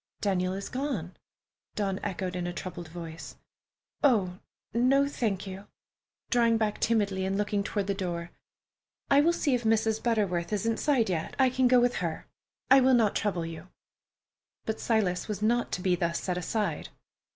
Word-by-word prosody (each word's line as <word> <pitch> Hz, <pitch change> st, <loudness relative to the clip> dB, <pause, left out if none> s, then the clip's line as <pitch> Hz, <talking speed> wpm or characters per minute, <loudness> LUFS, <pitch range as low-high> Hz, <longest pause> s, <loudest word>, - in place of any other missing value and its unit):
"Daniel 185 Hz, -2 st, 0 dB
is 195 Hz, +1 st, -5 dB
gone!" 250 Hz, -, -3 dB, 0.6 s
Dawn 195 Hz, -2 st, -1 dB
echoed 185 Hz, -2 st, -3 dB
in 175 Hz, -1 st, -2 dB
a 175 Hz, -, -3 dB
troubled 175 Hz, -2 st, -6 dB
voice. 165 Hz, -1 st, -8 dB, 0.7 s
"Oh, 200 Hz, -9 st, +3 dB, 0.3 s
no, 265 Hz, +4 st, +3 dB
thank 215 Hz, -9 st, -2 dB
you"—drawing 225 Hz, +4 st, -2 dB
back 215 Hz, -2 st, -1 dB
timidly 200 Hz, -4 st, +1 dB
and 190 Hz, +1 st, -1 dB
looking 205 Hz, -1 st, 0 dB
toward 200 Hz, -1 st, -2 dB
the 200 Hz, -, 0 dB
door. 175 Hz, -3 st, -4 dB, 0.8 s
"I 280 Hz, +1 st, +7 dB
will 330 Hz, +3 st, +4 dB
see 305 Hz, -5 st, 0 dB
if 245 Hz, -1 st, 0 dB
Mrs. 220 Hz, 0 st, +2 dB
Butterworth 200 Hz, -7 st, 0 dB
is 210 Hz, 0 st, -1 dB
inside 230 Hz, +1 st, +2 dB
yet. 165 Hz, -2 st, -3 dB
I 260 Hz, -2 st, +4 dB
can 255 Hz, 0 st, +3 dB
go 250 Hz, 0 st, +6 dB
with 245 Hz, 0 st, +2 dB
her. 165 Hz, -3 st, -3 dB, 0.5 s
I 270 Hz, -, +9 dB
will 260 Hz, 0 st, +5 dB
not 220 Hz, -4 st, +3 dB
trouble 185 Hz, -5 st, -1 dB
you." 165 Hz, +1 st, -8 dB, 1.0 s
But 220 Hz, -, -2 dB
Silas 200 Hz, -6 st, 0 dB
was 210 Hz, -1 st, -4 dB
not 240 Hz, +2 st, +1 dB
to 180 Hz, -, -2 dB
be 180 Hz, -1 st, +2 dB
thus 170 Hz, -1 st, -1 dB
set 180 Hz, -, -2 dB
aside. 205 Hz, +4 st, -2 dB
205 Hz, 165 wpm, -28 LUFS, 180-235 Hz, 1.0 s, I